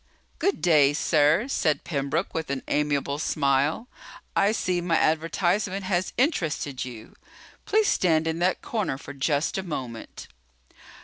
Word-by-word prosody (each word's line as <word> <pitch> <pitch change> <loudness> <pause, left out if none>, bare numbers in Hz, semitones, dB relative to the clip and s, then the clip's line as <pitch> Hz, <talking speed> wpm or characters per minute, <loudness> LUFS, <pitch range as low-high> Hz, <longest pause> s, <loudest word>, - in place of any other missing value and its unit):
"Good 395 - 0
day, 150 -5 +5
sir," 155 - +3
said 155 - 0
Pembroke 150 +3 -2
with 160 -4 -3
an 140 -1 -3
amiable 145 -1 0
smile. 145 - +1 0.5
"I 200 +1 +3
see 185 -5 -1
my 170 -2 +1
advertisement 180 +5 0
has 185 -1 0
interested 160 - 0
you. 120 -3 -10 0.5
Please 430 0 +3
stand 160 -3 +2
in 165 0 -2
that 180 +1 0
corner 210 - -2
for 145 - -9
just 145 +5 0
a - - -1
moment." 130 -9 -7
160 Hz, 135 wpm, -25 LUFS, 145-185 Hz, 0.5 s, day